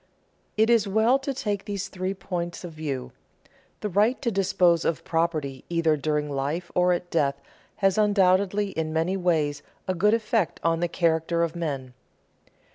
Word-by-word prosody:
_ - - -40 0.5
It 220 +2 +4
is 225 -3 +4
well 220 +6 +3
to 275 +1 -3
take 210 -7 -3
these 200 -2 -3
three 185 +1 -3
points 175 -2 -4
of 175 - -6
view. 145 -5 -4 0.7
The 210 - -2
right 210 +7 +2
to 235 - +1
dispose 180 -4 +2
of 165 - -1
property 160 -5 -1
either 165 -2 +2
during 150 0 -1
life 145 +5 -3
or 180 0 +3
at 175 0 -2
death 140 -4 +1 0.4
has 195 0 +2
undoubtedly 200 0 +3
in 160 -2 -3
many 165 +4 0
ways 155 -6 0 0.3
a 185 - +1
good 210 +5 +3
effect 220 -4 0
on 165 0 +2
the 175 - +1
character 170 0 +1
of 165 0 -2
men. 140 -7 -4
175 Hz, 170 wpm, -25 LUFS, 160-200 Hz, 0.7 s, It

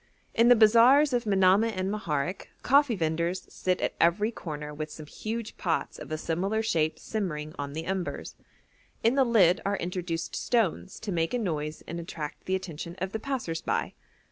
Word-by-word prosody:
In 230 +1 +4
the 245 - +9
bazaars 240 +6 +6
of 240 -1 +1
Manamah 200 +2 +4
and 185 +1 -1
Moharek 170 -4 -2 0.2
coffee 280 -2 +4
vendors 170 +1 -1
sit 185 -1 0
at - - 0
every 205 +7 +3
corner 150 -7 -6
with 155 +1 -5
some 155 0 -9
huge 225 +7 -5
pots 165 -3 -2
of - - -9
a 155 - -1
similar 190 +8 -1
shape 160 -7 +1
simmering 155 -9 -4
on 140 0 -4
the 160 +2 -4
embers; 190 -1 -3 0.7
in 230 +2 +4
the 270 0 +4
lid 200 -7 +4
are 200 0 0
introduced 175 -1 -3
stones 215 -6 0
to 215 - -4
make 165 +5 0
a - - +2
noise 155 -8 -3
and 170 - -5
attract 160 -3 -7
the 190 - 0
attention 170 -2 -6
of 190 +1 -3
the 220 - -3
passers 220 -11 -3
by. - - -1
185 Hz, 180 wpm, -28 LUFS, 165-220 Hz, 0.7 s, the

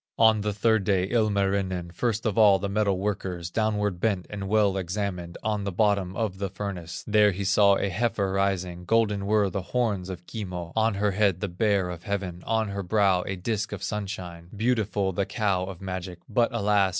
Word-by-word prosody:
On 110 -1 +5
the 105 0 -1
third 110 +1 +2
day, 95 -2 +2
Ilmarinen, 100 -5 0
First 115 +4 -1
of 110 -3 0
all 105 -3 +6
the 100 +2 -3
metal 100 -1 +1
workers, 95 -3 -3
Downward 105 -4 0
bent 100 -3 0
and 100 -2 -5
well 105 -2 +3
examined, 90 -2 -3
On 105 -2 -1
the 100 - -2
bottom 100 -1 +1
of 100 -4 -2
the 100 -1 -2
furnace; 90 -3 -6
There 105 -1 +5
he 100 0 -3
saw 100 +1 +5
a 100 - 0
heifer 100 -1 0
rising, 95 -2 -1
Golden 105 -2 +1
were 105 -2 +2
the 95 - -2
horns 100 -2 -1
of 90 -1 -7
Kimmo, 90 -6 -6
On 110 -1 +2
her 105 +1 +1
head 100 -2 +2
the 100 - -2
Bear 95 0 +1
of 85 -1 -7
heaven, 95 -4 -4
On 110 -1 +1
her 100 0 -3
brow 95 -1 +2
a 95 - -2
disc 110 +3 -2
of - - -6
sunshine, 95 -5 -5
Beautiful 105 -3 0
the 95 +2 -1
cow 100 -3 0
of 95 -2 -8
magic; 95 -2 -5
But 120 -2 +2
alas! 105 -3 +2
100 Hz, 195 wpm, -26 LUFS, 95-105 Hz, -, all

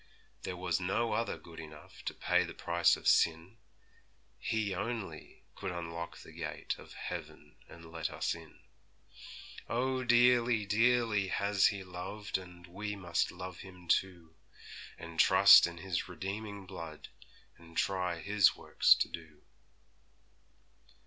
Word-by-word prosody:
There 90 - -5
was 90 -1 -1
no 105 +5 0
other 115 0 -1
good 85 -1 -13
enough 75 -1 -12
To - - -3
pay 90 0 +2
the 85 - -8
price - - +2
of - - -6
sin; 85 +7 +3 0.8
He 110 -2 -1
only 110 +2 -5
could 95 - -5
unlock 85 -1 -6
the - - -13
gate - - -4
Of - - -13
heaven - - -8
and 85 -1 -13
let 80 -1 -3
us - - -2
in. - - -13 1.1
Oh, 130 +2 0
dearly, 120 -2 +4
dearly 110 -1 +2
has 100 +1 +3
He 100 -2 -3
loved, 95 +3 -5
And 90 -1 -13
we 105 +4 -5
must 85 -4 -1
love 90 0 -8
Him 90 -2 -12
too, 85 -2 0 0.6
And 85 -1 -9
trust - - +8
in 85 -1 -8
His 90 0 -3
redeeming 100 +3 -6
blood, 85 -5 -9 0.5
And 85 -1 -14
try 90 -3 0
His 100 +2 +4
works - - +4
to - - 0
do.' 80 -3 -11
95 Hz, 135 wpm, -32 LUFS, 85-105 Hz, 1.1 s, trust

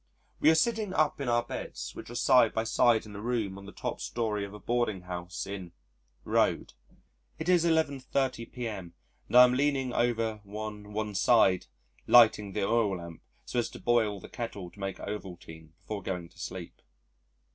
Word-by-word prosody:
We 155 - +5
are 160 - +6
sitting 215 +2 +1
up 150 -2 +1
in 135 - -1
our 120 0 +2
beds - - -6
which - - -9
are 120 - -8
side 120 -2 +4
by 110 - +1
side 115 0 +3
in 105 -1 -10
a 100 - -6
room 115 -4 -1
on 100 - -12
the - - -8
top - - -5
story 110 -3 -2
of 100 - -6
a 105 - -9
boarding 120 -5 -1
house 90 0 -5
in 95 -3 -7 0.5
Road. - - +1 0.6
It 160 - -5
is 175 -2 +4
11.30 140 -6 0
p.m. 105 -9 -6 0.3
and - - -4
I 125 - +12
am 125 0 +5
leaning 135 -2 +1
over 115 -3 0
one 105 0 -7
one 105 0 -3
side 95 -3 +4 0.4
lighting 110 -4 +6
the 105 - -1
oil 105 -2 +2
lamp 85 -2 -10 0.2
so 125 - -1
as 120 - -1
to - - -11
boil 110 -4 +1
the - - -11
kettle 100 -7 -6
to 100 - -18
make 95 -1 -4
Ovaltine 85 -6 -8
before 105 -2 -6
going 90 -3 -4
to 90 - -21
sleep. 90 -1 -7
110 Hz, 185 wpm, -29 LUFS, 95-120 Hz, 0.6 s, I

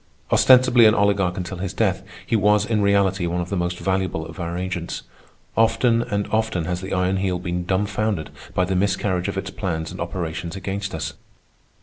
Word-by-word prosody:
Ostensibly 125 -3 +6
an 110 - +4
oligarch 100 -2 +2
until 95 0 -4
his 95 0 -4
death, - - +1 0.2
he - - 0
was 105 0 +3
in 110 -2 0
reality 100 -2 +2
one 85 +1 -1
of 90 0 -3
the 100 - -2
most 90 -1 -1
valuable 95 -4 -1
of 80 -1 -10
our 85 0 -3
agents. 90 -2 -4 0.5
Often 115 +1 +3
and 105 -4 -1
often 110 -6 0
has 90 +1 -2
the 95 - -6
Iron 90 +1 +1
Heel 95 -1 0
been 90 0 -3
dumbfounded 100 -1 -1 0.2
by 90 - +3
the 95 +1 -1
miscarriage 95 -1 0
of - - -3
its 95 -1 -4
plans 80 -5 -3
and - - -7
operations 85 0 -4
against 100 0 -4
us. 80 - -4
95 Hz, 190 wpm, -22 LUFS, 90-105 Hz, 0.5 s, Ostensibly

